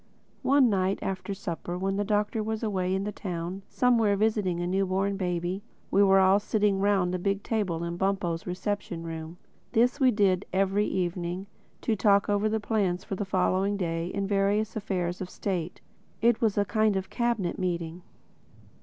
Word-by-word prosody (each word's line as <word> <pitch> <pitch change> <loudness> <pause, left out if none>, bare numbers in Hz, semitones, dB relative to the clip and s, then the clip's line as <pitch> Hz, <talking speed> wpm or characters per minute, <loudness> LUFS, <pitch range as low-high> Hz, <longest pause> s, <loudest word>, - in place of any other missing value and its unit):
One 275 -1 +4
night 195 -2 +1
after 195 +1 -3
supper 175 -2 -5
when 195 +1 -1
the 205 - 0
Doctor 210 +1 0
was 220 +1 -3
away 190 -3 0
in 195 - -1
the 210 - -3
town 180 -1 -5
somewhere 230 -5 +3
visiting 205 -4 +1
a 175 - -1
new 190 +2 +1
born 195 +2 0
baby, 180 0 -2 0.3
we 200 - +4
were 195 -1 +6
all 190 +1 +5
sitting 205 -1 +1
round 195 -3 +2
the 185 - -1
big 200 +2 -1
table 190 -7 -1
in 170 0 -3
Bumpo's 190 -3 -1
reception 180 -2 -3
room. 165 0 -6 0.4
This 245 +4 +3
we 260 -2 +5
did 200 -4 +2
every 195 +2 +2
evening, 180 0 -2 0.4
to 225 - +1
talk 200 0 +3
over 205 +1 +2
the 220 +1 0
plans 200 -5 0
for - - -6
the 200 +1 -2
following 190 +1 +1
day 170 -2 -2
and 200 -1 -1
various 205 +2 +1
affairs 185 -4 -2
of 185 - -4
state. 180 -3 -3 0.4
It 235 0 +3
was 220 -3 +2
a 205 - +3
kind 215 0 +2
of 190 0 -3
Cabinet 235 -7 -1
Meeting. 175 -2 -2
195 Hz, 180 wpm, -28 LUFS, 180-210 Hz, 0.4 s, were